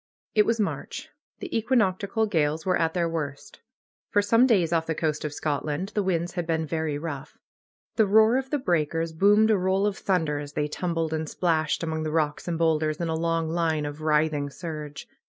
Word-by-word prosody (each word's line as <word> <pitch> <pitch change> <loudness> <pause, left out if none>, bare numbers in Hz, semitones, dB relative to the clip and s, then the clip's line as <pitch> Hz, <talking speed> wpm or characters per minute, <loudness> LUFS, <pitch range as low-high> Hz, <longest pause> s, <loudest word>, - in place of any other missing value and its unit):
It 210 -1 +4
was 230 0 +1
March. 205 - -3 0.3
The - - -5
equinoctial 220 -2 +1
gales 160 -5 0
were 185 -1 +2
at 165 0 0
their 170 -1 +1
worst. 150 -4 -5 0.5
For 205 - +2
some 230 +5 +4
days 180 -9 +2
off 165 -1 +1
the 160 - -1
coast 155 -1 -1
of 150 - -3
Scotland 150 +4 -2
the 215 - -1
winds 175 -3 -1
had 175 -2 -4
been 160 -1 0
very 160 -2 -2
rough. 145 -2 -6 0.6
The 220 -2 +4
roar 220 +4 +5
of 265 0 -3
the 295 - +1
breakers 165 - 0
boomed 205 +6 +4
a 210 - +4
roll 190 +2 +1
of 205 -2 0
thunder 160 -8 0
as 145 0 -8
they 150 0 -1
tumbled 165 0 -2
and 160 -1 -2
splashed 160 -3 0
among 160 -1 -2
the 155 - -2
rocks 155 0 -1
and 170 -1 -1
boulders 155 -2 +1
in 170 -1 -2
a 160 - 0
long 165 0 0
line 160 -2 0
of 145 +1 -6
writhing 150 -2 +1
surge. 150 -1 -7
165 Hz, 200 wpm, -26 LUFS, 155-190 Hz, 0.6 s, roar